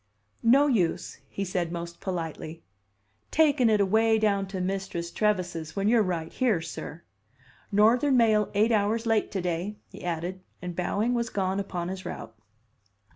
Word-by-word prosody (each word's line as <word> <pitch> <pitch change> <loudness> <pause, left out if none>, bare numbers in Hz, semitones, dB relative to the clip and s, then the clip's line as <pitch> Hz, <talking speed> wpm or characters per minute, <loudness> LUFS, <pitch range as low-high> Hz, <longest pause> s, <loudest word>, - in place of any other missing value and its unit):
"No 265 +5 +5
use," 210 - 0
he 200 - -3
said 180 -2 -2
most 170 0 -6
politely, 165 -3 -5 0.7
"takin' 290 -6 +4
it 215 -1 +3
away 220 +3 +3
down 200 -3 +1
to 190 -1 -5
Mistress 180 -2 -3
Trevise's 180 -6 -1
when 200 0 0
you're 230 0 +5
right 175 -5 -2
here, 235 -9 +2
sir. 165 0 -7 0.7
Northern 240 +7 +4
mail 215 -3 +4
eight 215 +3 +3
hours 220 +2 +1
late 225 -2 +2
to 195 - -3
day," 180 +4 -2
he - - -12
added, 175 +2 -3 0.2
and 180 -1 -6
bowing, 205 +7 0
was 235 -1 0
gone 190 -1 -1
upon 180 -3 -3
his 190 0 -5
route. 110 - -7
195 Hz, 155 wpm, -27 LUFS, 175-220 Hz, 0.7 s, No